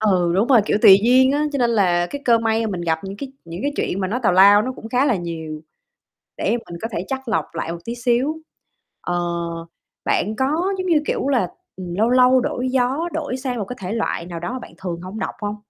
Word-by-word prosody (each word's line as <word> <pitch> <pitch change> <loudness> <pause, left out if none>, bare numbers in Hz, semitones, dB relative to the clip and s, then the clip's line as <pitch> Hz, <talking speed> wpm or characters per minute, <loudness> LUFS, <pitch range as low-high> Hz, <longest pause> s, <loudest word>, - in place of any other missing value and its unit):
Ừ, 185 -5 +2
đúng 205 +5 +2
rồi, 250 -5 +6
kiểu, 205 - +1
tùy 195 -4 +9
duyên 260 +2 +5
á. 295 +1 +1
Cho 285 - -2
nên 240 -3 +2
là 180 -6 +2
cái 285 - -6
cơ 230 -2 +5
may 225 0 0
mà 215 - -2
mình 180 -2 -4
gặp 160 +1 -1
những 195 +1 -7
cái 270 +2 -7
những 170 +3 -7
cái 285 - 0
truyện 190 - -2
mà 190 - -1
nó 230 +6 -2
tào 200 - +4
lao, 200 +3 +7
nó 255 - -3
cũng 225 - -9
khá 255 +3 +2
là 255 -6 +2
nhiều, 160 -3 -6 0.8
để - - -1
mình 200 -8 -3
có 225 - -2
thể 175 - -3
chắt 265 -2 -4
lọc 220 - +1
lại 165 0 -4
một 170 - -6
tí 235 - -4
xíu. 245 +5 0 0.7
Ờ, 175 - -2 0.9
bạn 215 +3 0
có 265 - +1 0.3
giống 370 0 -3
như, 320 -4 +3
kiểu - - -1
là, 250 -9 +2 0.3
ừm, 180 -2 -7
lâu 220 +4 +2
lâu 255 +1 +5
đổi 250 +1 -2
gió, 265 +6 0
đổi 290 -5 -3
sang 255 -2 -3
một 210 - -3
cái 250 - -7
thể 185 +3 -4
loại 225 -6 -2
nào 170 -1 -6
đó 175 +9 -4
mà 255 - -4
bạn - - -11
thường 175 -2 -5
hổng 185 +4 -7
đọc - - -4
hông? 205 0 -3
225 Hz, 250 wpm, -21 LUFS, 185-255 Hz, 0.9 s, tùy